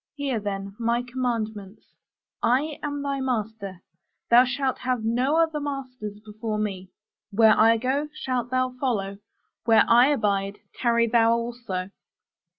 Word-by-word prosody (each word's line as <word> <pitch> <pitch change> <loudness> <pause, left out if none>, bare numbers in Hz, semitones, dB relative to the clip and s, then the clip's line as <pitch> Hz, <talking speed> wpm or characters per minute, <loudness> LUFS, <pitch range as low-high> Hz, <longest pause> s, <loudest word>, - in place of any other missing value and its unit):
Hear, 275 -5 -2
then, 195 -1 -5
my 235 +1 +1
commandments: 225 -5 -4 0.5
I 280 +5 +1
am 290 -1 -3
thy 280 -1 -2
master: 220 -7 -3 0.5
thou 245 +2 +8
shalt 260 +1 -1
have 250 -3 -1
no 250 +6 +1
other 320 -2 +2
masters 255 -7 -6
before 215 0 -4
me. 195 -3 -3 0.4
Where 220 +1 +5
I 225 +1 +5
go, 270 +5 -1
shalt 255 -5 -3
thou 255 0 0
follow; 200 -7 -2 0.5
where 225 -2 +5
I 240 +2 +6
abide, 205 -7 0 0.2
tarry 235 -1 +2
thou 230 0 +4
also. 230 -6 -4
235 Hz, 135 wpm, -25 LUFS, 210-260 Hz, 0.5 s, thou